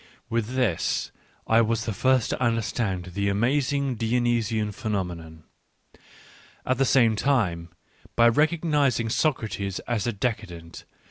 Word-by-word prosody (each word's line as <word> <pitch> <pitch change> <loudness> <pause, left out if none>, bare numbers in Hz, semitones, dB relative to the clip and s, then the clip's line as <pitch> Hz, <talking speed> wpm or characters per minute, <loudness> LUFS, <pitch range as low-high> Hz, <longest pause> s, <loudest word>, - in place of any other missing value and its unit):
— - - -38
with 115 +2 -1
this 120 -11 0 0.3
I 115 +1 +4
was 115 0 0
t 115 - -2
he - - -6
ji 130 - -2
rst 130 -3 +3
to - - -2
und 115 -1 +2
erstand 95 -6 -3
the 100 +1 0
amazing 135 +5 +1
Dionysian 115 -2 0
pheno 100 -1 -2
menon 80 -2 -10 0.5
^ - - -26 0.7
At 130 0 0
the 135 - +4
same 115 -2 +4
time, 100 -10 0 0.5
Jby 115 0 +6 0.3
recognisiog^^cr^tes^ 120 - 0
as 120 -3 -1
a - - +1
de 115 +3 0
caden 85 -6 -12
t. - - -10
115 Hz, 155 wpm, -25 LUFS, 100-125 Hz, 0.7 s, Jby